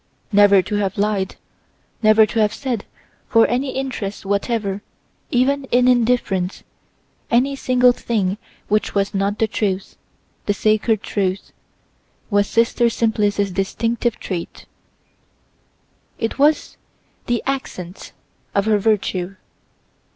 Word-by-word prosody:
Never 200 -2 +6
to 210 - -3
have 195 -2 -1
lied, 200 -2 0 0.7
never 215 0 +6
to 225 - -3
have 210 -1 +2
said, 250 -7 -3 0.4
for 230 -2 +5
any 260 +2 -1
interest 235 -8 -4
whatever, 200 0 -1 0.5
even 270 +3 +1
in 250 -1 +3
indifference, 230 -7 +1 0.7
any 265 +4 +2
single 250 -2 +4
thing 210 -5 -1 0.3
which 215 0 0
was 200 0 +1
not 200 +1 0
the 225 - +2
truth, 195 -3 -2 0.5
the 205 - +1
sacred 215 0 +1
truth, 195 -1 -2 0.8
was 205 0 +3
Sister 235 +1 +2
Simplice's 205 -3 0
distinctive 230 +5 -1
trait; 175 -3 -6 1.5
it 225 +4 -3
was 295 +2 +2 0.5
the 240 -1 0
accent 195 -9 -5 0.4
of 200 0 +2
her 215 -1 +3
virtue. 195 -3 0
215 Hz, 115 wpm, -20 LUFS, 200-240 Hz, 1.5 s, Never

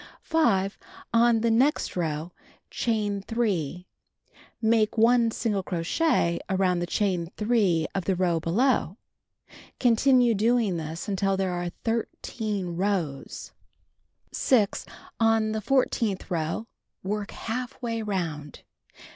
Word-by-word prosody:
5. 200 - +1 0.3
On 230 -1 +4
the 230 0 +2
next 260 +7 +2
row, 160 -1 -2 0.4
chain 210 -4 -1
3, 190 -7 -2 0.7
make 220 -1 +2
1 230 +1 +4
single 215 -3 -1
crochet 170 - 0
around 185 -2 +1
the 175 - -2
chain 180 -4 0
3 210 -8 +2
of 190 - -2
the 190 - +1
row 175 -2 +1
below. 200 - +1 0.8
Continue 245 0 +4
doing 220 -3 +2
this 160 +1 -5
until 195 -1 0
there 190 -1 0
are 175 0 -2
13 215 -5 -3
rows. 180 -8 -2 0.8
6. 220 -6 +1 0.3
On 225 -1 +3
the 215 0 -2
fourteenth 230 -5 0
row, 165 +5 -2 0.4
work 205 +2 -3
half 245 +2 -5
way 230 -2 -3
around. 165 -8 -4
205 Hz, 115 wpm, -26 LUFS, 180-230 Hz, 0.8 s, On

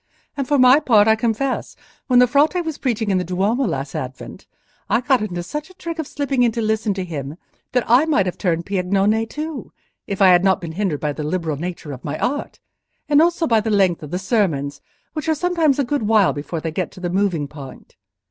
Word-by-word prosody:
And 275 -3 -3
for 290 - +2
my 255 +1 +7
own - - -1
part, 215 -6 +4
I 220 - +5
confess, 235 +4 -2 0.3
when 250 -2 +3
the 250 - +7
Frate 300 +7 +2
was 320 -2 -4
preaching 225 -5 -1
in 185 - +2
the - - -1
Duomo 200 +9 0
last 140 -5 -3
Advent, 130 0 -7 0.4
I 230 - +3
got 255 -1 +2
into 175 -5 -3
such 300 - -6
a 370 - -17
trick 335 -2 -6
of 315 - -3
slipping 280 -3 -1
in 240 -1 +4
to 235 - -3
listen 220 -1 0
to 190 -1 -3
him 150 -3 -6 0.4
that 250 -1 +2
I 245 +6 +5
might 280 -12 +2
have 180 - -3
turned 170 -3 0
Piagnone 200 +3 +1
too, 300 -1 -6 0.4
if 200 - -4
I 195 -2 +6
had 180 0 +5
not 190 -1 +3
been 170 -2 -6
hindered 175 -4 -2
by 150 -1 -1
the 155 - -6
liberal 160 -1 -2
nature 170 -2 -6
of 130 -2 -9
my 150 +1 -4
art; 285 +3 -3 0.5
and 295 0 +5
also 340 0 +2
by 230 -5 +3
the 220 - -3
length 190 -5 +2
of 150 - -8
the 175 - -2
sermons, 180 - -1 0.3
which 315 +1 -3
are 315 - +3
sometimes 330 -4 +1
a 285 - +2
good 285 +2 -1
while 215 -3 +4
before 155 +3 -5
they 160 - -3
get 180 +3 -2
to - - -12
the 175 -1 -3
moving 180 -6 0
point. 140 -2 -12
210 Hz, 235 wpm, -20 LUFS, 175-270 Hz, 0.5 s, my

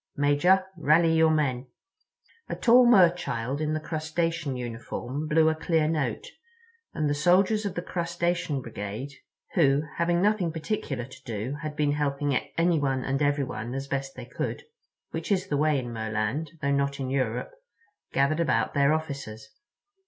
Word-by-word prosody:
Major, 145 +7 +3
rally 160 +1 +4
your 160 0 +5
men." 135 -5 0 0.8
A - - -2
tall 245 +1 +6
Merchild 170 - +3
in 155 0 0
the - - -1
Crustacean 160 -2 -2
uniform 125 +4 -5
blew 160 +1 +4
a 160 - +4
clear 160 -1 +1
note, 155 - -1 0.7
and 155 -2 0
the 145 - +1
soldiers 185 +8 +3
of 185 - -6
the 175 - -3
Crustacean 170 -5 -2
Brigade, 110 +5 -6 0.4
who 145 -3 +3
having 170 +1 +2
nothing 200 -3 +2
particular 155 - -3
to 135 +1 -14
do 120 +4 -4
had 155 -1 -5
been 150 -1 +1
helping 145 -1 0 0.2
anyone 145 -6 +1
and 135 +1 -1
everyone 135 -5 -1
as 135 0 -4
best 135 0 -3
they - - -8
could, - - -4 0.5
which - - -4
is 190 -1 +2
the 145 - 0
way 150 0 +2
in 120 -3 -4
Merland, 110 +7 -2
though 140 - +1
not 140 0 0
in 130 -1 -3
Europe, 135 - -1 0.6
gathered 140 +4 +2
about 170 - +1
their 140 +1 +3
officers. 140 -9 -5
150 Hz, 155 wpm, -27 LUFS, 135-165 Hz, 0.8 s, tall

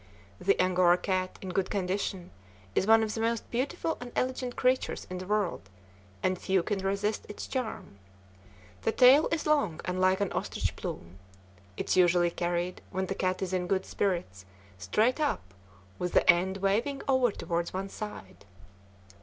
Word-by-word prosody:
The 195 +1 +2
Angora 180 -1 +4
cat, 185 0 -2
in 190 - -5
good 185 +1 -1
condition, 190 -2 -2 0.4
is 190 - +1
one 225 0 +6
of 215 -1 -2
the 225 - -3
most 230 0 -1
beautiful 275 +6 -1
and 245 0 -7
elegant 255 -1 -1
creatures 255 0 0
in 185 - -4
the 185 - -7
world, 200 - -1 0.5
and 185 -1 +1
few 190 -2 +1
can 205 +1 -1
resist 200 +2 -1
its 210 - -6
charm. 230 - -5 0.8
The - - 0
tail 265 +5 +7
is 325 -1 -1
long 285 - +2
and 180 +1 -2
like 185 0 +3
an 200 -2 -1
ostrich - - -2
plume. 85 +3 -7 0.6
It - - -4
is - - +2
usually 175 -1 +4
carried, 175 +1 -2
when 190 0 -2
the 195 - -3
cat 185 0 -1
is 190 0 -3
in 180 -1 0
good 190 +1 0
spirits, 170 - -2 0.4
straight 215 - +1
up, 95 - -1 0.5
with 180 0 -2
the - - +3
end 185 +2 +4
waving 220 +9 0
over 260 -3 +3
toward 170 -3 -2
one 195 +1 -4
side. 210 - -8
190 Hz, 170 wpm, -29 LUFS, 180-225 Hz, 0.8 s, tail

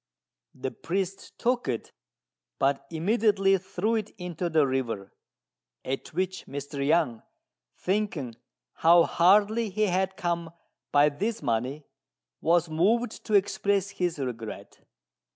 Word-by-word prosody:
The 130 0 -4
priest 190 +2 -4
took 245 +1 0
it, 120 -3 -3 0.7
but 140 0 +1
immediately 195 +3 +2
threw 190 +4 -2
it 215 -2 -1
into 180 -1 -3
the 155 -3 +4
river, 120 -7 -2 0.7
at 135 +1 -3
which 185 +1 -2
Mr. 140 0 -5
Yang, 140 -6 +2 0.6
thinking 185 - -1 0.4
how 170 +1 +6
hardly 205 +7 +4
he 215 +3 0
had 190 -1 0
come 170 -1 -2 0.4
by 145 +1 +5
this 205 +7 -3
money, 130 +4 -1 0.6
was 170 +1 +3
moved 210 +9 +1
to 215 - +1
express 200 0 +2
his 175 -4 -1
regret. 120 -5 -6
175 Hz, 115 wpm, -27 LUFS, 140-200 Hz, 0.7 s, how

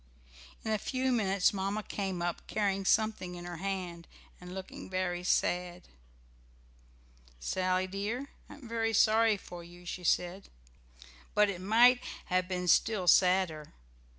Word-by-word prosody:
In 220 - -1
a 215 - +1
few 260 +4 -1
minutes 200 -6 +2
Mamma 200 +2 -2
came 190 -4 -3
up, 175 -1 -3
carrying 195 -2 -1
something 210 -4 +1
in 175 0 -8
her 175 -1 -6
hand, 180 -2 -4 0.3
and 180 0 -9
looking 190 0 -8
very 180 -1 -2
sad. 180 0 0 1.6
"Sally 185 - 0
dear, 210 +8 -4 0.2
I - - -10
am 280 -4 -12
very 225 -1 -1
sorry 220 0 +4
for 175 -2 -10
you," 175 +1 -14
she 180 0 -6
said, 180 +3 0 0.9
"but 210 -1 +4
it 180 -2 -7
might 240 +5 +5 0.2
have 185 0 0
been 180 -1 -3
still 190 0 +3
sadder. 180 -5 +3
190 Hz, 140 wpm, -31 LUFS, 180-215 Hz, 1.6 s, might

